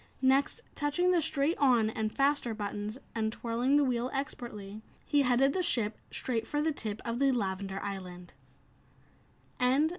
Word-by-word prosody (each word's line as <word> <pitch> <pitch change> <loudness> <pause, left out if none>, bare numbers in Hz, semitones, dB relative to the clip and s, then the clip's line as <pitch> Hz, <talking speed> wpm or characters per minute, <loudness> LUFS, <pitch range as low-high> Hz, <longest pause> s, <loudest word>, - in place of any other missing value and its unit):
Next, 265 +2 +3
touching 315 +5 +1
the 350 -2 +3
"straight 310 +1 0
on" 240 -6 +4
and 220 -1 -2
"faster" 275 -4 +1
buttons, 210 +1 -4 0.2
and 220 -1 0
twirling 240 +4 0
the 290 - +5
wheel 250 -2 0
expertly, 215 -6 -5 0.2
he 290 - +3
headed 270 +1 +3
the 375 - +1
ship 230 -11 +1
straight 225 -3 -2
for 295 - -1
the 315 +1 +2
tip 215 -6 -4
of 235 0 -2
the 275 -1 +4
lavender 195 -4 -2
island. 180 -3 -6
240 Hz, 150 wpm, -31 LUFS, 215-280 Hz, 0.2 s, the